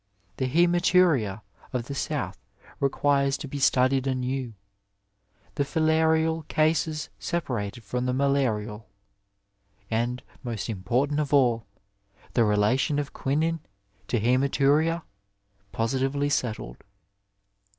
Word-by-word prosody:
The 130 - -1
haematuria 170 - +3 0.3
of 125 -2 -2
the 140 - -6
South 125 - -3 0.4
requires 140 0 +2
to 145 - -7
be 140 +1 -5
studied 130 0 +3
anew 130 -2 -2 0.5
— 100 +1 -38
^the 140 - +2
filarial 160 +1 +2
cases 155 0 +1
separated 120 -9 -3
from 125 +4 -2
the - - +1
malarial, 115 -6 0 1.0
and, 120 +3 -1 0.2
most 115 -4 -4
important 125 +9 0
of 145 -1 +1
all, 120 -5 +3 0.7
the 120 - +4
relation 110 +8 +2
of 145 -1 -3
quinine 160 +4 0 0.5
to 120 - 0
luematuria 140 +7 +2 0.7
positively 135 +4 0
settled. 110 - -2
135 Hz, 105 wpm, -26 LUFS, 115-150 Hz, 1.0 s, the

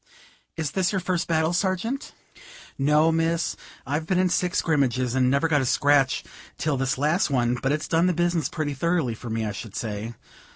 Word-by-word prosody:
"Is 155 -4 -2
this 185 +2 +1
your 195 - 0
first 180 -1 -1
battle, 160 0 +1
Sergeant?" 190 +9 -1 0.6
"No, 150 +3 +3
miss; 165 +1 0 0.3
I've 150 +4 -2
been 185 - +1
in 185 0 +3
six 180 0 0
scrimmages, 130 -6 +1
and 130 -1 +3
never 140 +5 +2
got 150 -3 +2
a - - -1
scratch 140 0 +3 0.3
till 150 -2 0
this 135 0 -1
last 155 +7 +1
one; 120 -3 +1
but 135 - 0
it's 155 +1 -1
done 165 +2 +2
the 180 - +2
business 170 -3 0
pretty 155 -4 -3
thoroughly 160 -3 0
for 115 +2 -8
me, 110 0 -2
I 105 - -2
should 100 +1 -8
say. 110 +1 -4
150 Hz, 195 wpm, -25 LUFS, 130-170 Hz, 0.6 s, No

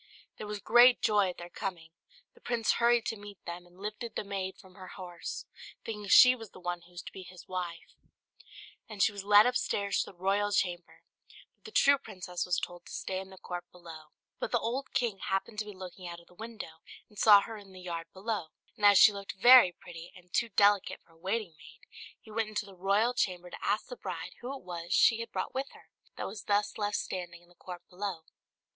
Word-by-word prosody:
There 210 - -7
was 210 0 -4
great 240 +3 +6
joy 205 -3 +3
at 180 - -7
their 175 - -8
coming, 170 -4 -5 0.4
the 475 - -22
prince 235 -2 +1
hurried 235 -1 +3
to - - -2
meet 205 -1 -11
them, 175 +1 -7
and 175 +1 -22
lifted 215 +3 -6
the - - -2
maid 195 -2 -4
from 190 -2 -17
her 185 -1 -11
horse, 175 -3 -6 0.4
thinking 210 -2 -5
she 250 +5 +9
was 225 -4 -9
the - - -14
one 175 -1 -3
who 175 +1 -20
was 175 - -8
to - - -9
be 190 - -9
his 180 -1 -13
wife; 175 -2 -5 1.0
and 205 -3 0
she - - +4
was 200 -1 -7
led 205 +1 +7
upstairs 205 -5 0
to - - -3
the 185 - -26
royal 200 +3 +1
chamber, 175 -3 -2 0.5
but - - -44
the 440 - -9
true 280 -8 +5
princess 180 -6 -5
was 180 - +1
told 175 0 -7
to - - -11
stay 185 -1 -3
in 190 0 -8
the 190 - -13
court 175 -1 -6
below. 165 -3 -11 0.3
But - - -3
the 240 - +3
old 240 +4 -3
king 225 -6 0
happened 195 +3 -2
to 215 - -2
be 210 -2 -9
looking 185 -1 -9
out 170 0 -7
of 170 - -19
the - - -21
window, 215 -6 -9 0.3
and 210 - -13
saw 205 -2 +8
her 225 - -7
in 200 -2 -12
the 185 - -12
yard 170 -2 -5
below; 195 -2 -3 0.3
and 210 - -12
as 205 -1 +8
she 210 - +8
looked 200 -1 -6
very 245 -3 +9
pretty, 170 -1 -11
and 180 -1 -18
too 235 - +1
delicate 205 -1 +3
for - - -27
a - - -23
waiting 190 0 -2
maid, - - -15 0.4
he 220 - -15
went 220 0 -1
into 210 -1 -3
the 200 - -13
royal 200 +6 +2
chamber 180 -6 -1
to - - -9
ask 210 +2 0
the - - -8
bride - - -6
who 245 +2 -5
it - - -17
was 175 -1 -5
she 230 -2 +5
had 230 -1 -6
brought - - -3
with 270 +1 -3
her, - - -18 0.3
that - - -4
was 205 +3 -7
thus 205 +1 0
left 205 0 0
standing 175 -2 -5
in 175 - -24
the - - -21
court 180 0 -10
below. 185 -3 -5
195 Hz, 230 wpm, -31 LUFS, 180-215 Hz, 1.0 s, she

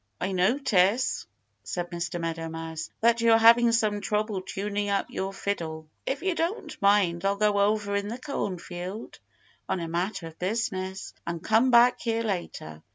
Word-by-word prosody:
"I 190 - -2
notice," 200 +2 +2 0.4
said 175 0 -4
Mr. 175 0 -3
Meadow 165 -1 -3
Mouse, 160 0 -6
"that 235 +1 +4
you're 230 -1 +6
having 230 +1 +6
some 215 -3 +1
trouble 210 -2 -1
tuning 205 +2 -3
up 200 -1 -1
your 190 +1 -3
fiddle. 165 -6 -3
So 155 +10 -7
if 275 - -12
you 380 -1 +1
don't 335 +6 -3
mind 200 -4 +3
I'll 195 0 +2
go 205 0 +2
over 205 0 +1
in 200 0 -1
the 230 +3 -4
cornfield 190 - -5 0.5
on - - 0
a 165 - -4
matter 175 +2 -2
of 165 0 -11
business 190 -1 -3
and 170 0 -4
come 225 +4 +3
back 245 +1 +6
here 230 -1 -1
later. 170 - -4
200 Hz, 165 wpm, -27 LUFS, 175-225 Hz, 0.5 s, you're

